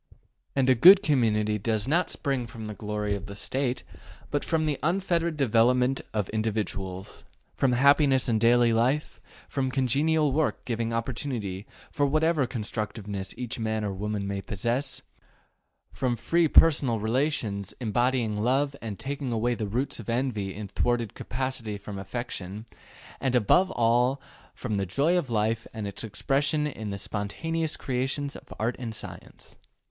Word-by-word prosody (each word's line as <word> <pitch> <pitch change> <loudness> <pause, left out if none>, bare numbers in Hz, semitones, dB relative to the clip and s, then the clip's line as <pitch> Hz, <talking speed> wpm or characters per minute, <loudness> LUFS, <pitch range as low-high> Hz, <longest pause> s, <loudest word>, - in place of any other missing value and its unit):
And 135 -2 +2
a 130 - +7
good 185 - +8
community 105 - +2
does 110 +1 0
not 170 +6 +2
spring 135 -5 -2
from 115 -2 -8
the 105 - -5
glory 105 -1 -2
of 100 -1 -5
the 100 - -8
State, 130 +3 -1 0.5
but 145 - 0
from 160 -1 0
the 150 -3 -1
unfettered 170 0 0
development 125 +1 +3
of 105 -3 -1
individuals: 100 -3 -3 0.3
from 130 -2 +2
happiness 140 0 +4
in 110 -3 +2
daily 120 +1 +4
life, 130 +7 0 0.3
from 135 -2 -1
congenial 140 +4 +2
work 155 +2 0
giving 115 -1 -2
opportunity 115 -4 -3 0.2
for 145 - +1
whatever 155 -1 +2
constructiveness 105 -4 -4
each 125 0 -4
man 110 -1 -1
or 100 - -2
woman 105 +1 -3
may 100 0 -3
possess, 120 +8 -2 0.9
from 125 -3 0
free 165 +9 +2
personal 145 -7 +5
relations 110 - -1
embodying 120 -2 0
love 135 +4 +1
and 110 -4 -5
taking 140 -1 -4
away 120 +2 +1
the 110 -3 -3
roots 125 +7 -1
of 115 - -8
envy 115 -6 -1
in 105 0 -6
thwarted 120 +1 0
capacity 125 -4 -3
from 100 0 -7
affection, 105 -1 -5 0.5
and 130 -2 0
above 150 - +4
all 120 +3 +2 0.4
from 110 -5 -3
the 100 - 0
joy 145 - +2
of 170 -7 0
life 110 0 0
and 110 -2 -4
its 100 - -5
expression 140 +8 0
in 110 -8 -4
the 100 - -3
spontaneous 155 +12 -2
creations 135 +2 -2
of 130 - -12
art 115 +3 0
and 115 -3 -4
science. - - -9
120 Hz, 150 wpm, -27 LUFS, 105-140 Hz, 0.9 s, good